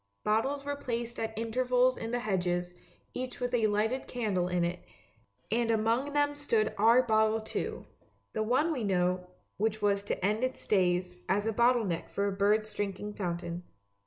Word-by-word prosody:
Bottles 265 +7 +1
were 285 0 -2
placed 235 -3 -4
at 225 -1 -3
intervals 250 +2 +2
in 225 - -5
the 245 +1 -1
hedges, 180 -4 -1 0.4
each 255 0 -5
with 245 0 -2
a 225 -3 +3
lighted 220 +5 0
candle 205 -7 -1
in 180 -1 0
it, 175 +1 -2 0.7
and 230 +1 +1
among 230 +6 +1
them 290 0 +2
stood 235 -7 0
our 230 +5 +5
bottle 220 -1 +3
too, 220 - -4 0.5
the 220 - -1
one 255 +9 +2
we 255 -6 -3
know, 180 -2 +1 0.3
which 215 +1 0
was 200 -1 +1
to 190 - -2
end 215 +4 +1
its 255 0 -2
days 180 -2 +1
as 205 +2 +2
a 225 - 0
bottle 235 +1 +4
neck 170 -3 -3
for 200 - -1
a - - 0
bird's 210 +2 +1
drinking 205 +1 -3
fountain. 175 -3 -3
220 Hz, 175 wpm, -30 LUFS, 195-245 Hz, 0.7 s, our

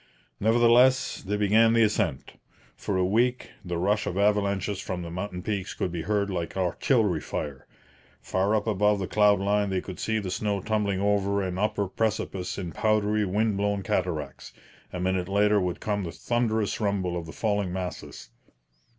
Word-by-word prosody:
Nevertheless, 120 +4 +4
they 105 +1 -2
began 110 +3 +4
the 115 -1 +5
ascent. 105 -10 -1 0.4
For 95 - -2
a 90 - +2
week 120 +6 +1
the 90 -2 -3
rush 105 +4 +1
of 90 - -3
avalanches 100 -1 +1
from 90 -2 -4
the 85 - -7
mountain 90 0 -5
peaks 100 -3 -3
could 90 - -2
be 85 -1 -3
heard 100 +1 0
like 85 0 -4
artillery 95 - +1
fire. 70 -3 -5 0.5
Far 100 +3 0
up 105 - 0
above 105 -1 +2
the 95 - -2
cloud 105 0 +3
line 100 +1 +1
they 95 -1 0
could 95 0 -8
see 110 0 0
the 100 -4 -3
snow 100 +1 -1
tumbling 100 -1 -1
over 100 0 +1
an 90 0 -3
upper 105 -1 0
precipice 100 -3 -2
in 90 -4 -4
powdery 105 +3 +1
wind 105 +2 0
blown 100 -1 0
cataracts; 90 -6 -3 0.4
a 90 - -5
minute 90 0 -1
later 105 +1 +3
would 90 -1 -2
come 105 -2 -2
the 85 - -4
thunderous 110 -2 -1
rumble 100 -4 0
of 85 -1 -5
the - - -7
falling 100 -3 -1
masses. 90 -1 -6
100 Hz, 175 wpm, -26 LUFS, 90-105 Hz, 0.5 s, the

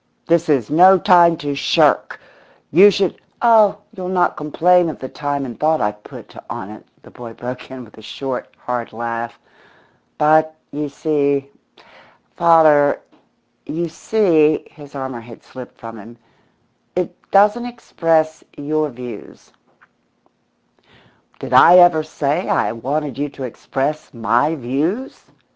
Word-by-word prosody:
This 170 0 +1
is 130 -8 +1
no 185 +5 +6
time 175 -3 +4
to 145 -1 -4
shirk! 140 - +1 0.5
You 190 +7 +7
should 195 -2 -1
" - - -41
"Oh, 220 -4 +5 0.2
you'll 185 -1 -6
not 180 -1 +1
complain 170 +3 +2
of 155 - -7
the 130 - -7
time 145 0 -4
and 120 -3 -9
thought 155 +1 +1
I've 105 0 -3
put - - -13
on 95 - -7
it," 110 - -12 0.2
the - - -16
boy 120 -2 -10
broke 125 +2 -8
in 130 -2 -9
with 110 - -19
a - - -13
short, 130 +3 -6
hard 120 -2 -5
laugh. 115 +1 -5 0.8
"But, 155 +1 +3 0.2
you 150 0 -4
see, 140 -2 -1 0.8
father 155 -4 +4 0.7
you 170 +2 -3
see" 160 -6 +1
his 145 -3 -15
armour 130 -3 -6
had 115 0 -14
slipped 125 -1 -12
from 115 -3 -10
him 115 +4 -14 0.8
"it 180 0 -2 0.2
doesn't 210 +5 +3
express 165 -9 -1
your 155 +1 -1
views." 120 -4 -11 1.8
"Did - - -7
I 180 - +8
ever 175 -3 +6
say 155 +2 -3
I - - +1
wanted 135 +4 -4
you 145 0 -2
to 135 - -10
express 135 +4 -4
'my 120 +7 +1
views'? 155 - -3
150 Hz, 140 wpm, -18 LUFS, 125-170 Hz, 1.8 s, I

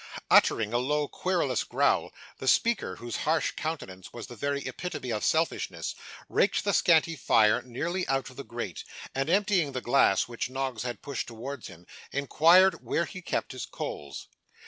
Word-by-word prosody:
Uttering 110 0 +4
a 120 - +3
low 145 +3 0
querulous 170 -10 0
growl, - - +1 0.3
the 130 - -5
speaker, 205 - +2
whose 120 +2 -5
harsh 155 -1 +1
countenance 95 - -6
was 120 - -7
the 120 - -10
very 140 +4 -2
epitome 180 -8 -5
of 105 -2 -2
selfishness, 160 +1 0 0.3
raked - - +2
the - - +1
scanty 165 -1 +4
fire 115 -4 +4
nearly 165 +10 -3
out 135 -1 0
of - - -16
the 140 - -7
grate, 115 -9 -6 0.3
and, 135 +3 -1
emptying 190 -6 +2
the 130 - -2
glass 120 -7 +3
which 120 +1 -4
Noggs 130 -3 -3
had 120 -3 -5
pushed 140 -4 -4
towards 120 +3 -7
him, 90 -1 -13 0.3
inquired 170 +7 +4
where 170 - 0
he 185 - -9
kept - - -2
his 130 -3 -6
coals. 70 -1 -6
135 Hz, 170 wpm, -28 LUFS, 120-160 Hz, 0.3 s, Uttering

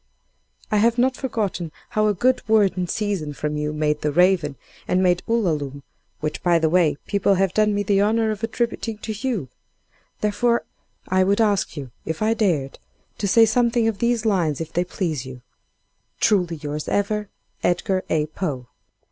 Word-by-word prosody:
"I 210 - +3
have 230 +3 +3
not 255 +1 +2
forgotten 210 - -3 0.2
how 215 0 +1
a 210 - +1
'good 255 +6 +2
word 210 -3 +4
in 180 -1 -2
season' 190 -7 -2
from 150 +1 -3
you 150 0 -2
made 150 0 0
'The 150 - 0
Raven,' 175 -3 +3 0.3
and 185 +1 +2
made 180 -1 +3
'Ulalume' 150 - -1 0.4
(which 150 0 -3
by 175 -1 +3
the 160 -1 +1
way, 170 -5 +3
people 200 -1 +2
have 190 -1 +1
done 210 -1 +2
me 205 - 0
the 200 0 +2
honor 220 +1 +2
of 215 0 -6
attributing 225 -1 -2
to 220 +1 -5
you), 220 - -2 0.7
therefore, 235 +3 +1 0.4
I 185 0 +3
would 200 +3 +2
ask 205 -6 +1
you 135 -4 -6
(if 160 +6 -3
I 220 +1 +3
dared) 170 -12 0 0.4
to 200 - 0
say 225 +3 +6
something 235 0 +2
of 215 -3 -1
these 235 -1 +1
lines 175 -9 +1
if 165 -1 -6
they 175 - +1
please 165 -7 -3
you. 125 -1 -10 0.8
"Truly 180 -5 +2
yours 150 0 -5
ever, 210 0 -1 0.3
"EDGAR 185 +2 0
A. 155 -1 +1
POE." 150 -5 -4
195 Hz, 175 wpm, -22 LUFS, 155-215 Hz, 0.8 s, say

